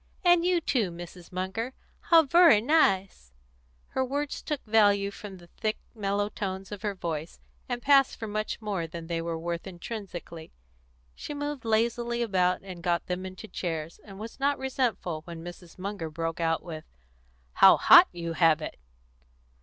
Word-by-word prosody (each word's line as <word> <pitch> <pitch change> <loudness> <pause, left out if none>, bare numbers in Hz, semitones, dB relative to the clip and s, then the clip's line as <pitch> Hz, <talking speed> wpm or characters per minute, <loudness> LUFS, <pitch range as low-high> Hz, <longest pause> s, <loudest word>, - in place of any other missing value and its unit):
And 350 -1 +5
you 355 0 +3
too, 235 - 0
Mrs. 175 +1 -10
Munger. 190 +7 -3 0.2
How 330 -1 +5
vurry 335 -6 +6
nice!" 195 - +1 0.6
Her 260 - 0
words 285 +2 -3
took 300 -3 -4
value 205 -2 +3
from 200 -1 -9
the 175 - -15
thick 215 +5 -3 0.2
mellow 205 -2 -1
tones 195 -2 -5
of 205 -2 -7
her 205 -2 -2
voice, 165 -3 -5 0.3
and 245 -1 -3
passed 275 -1 +5
for 225 - -5
much 215 +1 -3
more 195 -6 -2
than 165 0 -8
they 165 0 -2
were 165 0 -3
worth 170 +2 -4
intrinsically. 175 -3 -8 0.6
She 295 - -7
moved 290 -3 -4
lazily 235 +2 +1
about 185 -4 +1
and 185 -3 -9
got 170 -1 0
them 185 +1 -3
into 185 +3 -10
chairs, 165 -5 -4
and 195 -2 -12
was 220 +5 -9
not 280 +1 +1
resentful 250 - -2
when 170 -1 -8
Mrs. 175 0 -11
Munger 190 -3 -5
broke 165 +1 -4
out 165 -1 0
with 160 -3 -7 0.7
"How - - +7
hot - - +8
you 170 -1 -5
have 165 -1 +4
it!" 155 - -7
195 Hz, 165 wpm, -28 LUFS, 170-235 Hz, 0.7 s, hot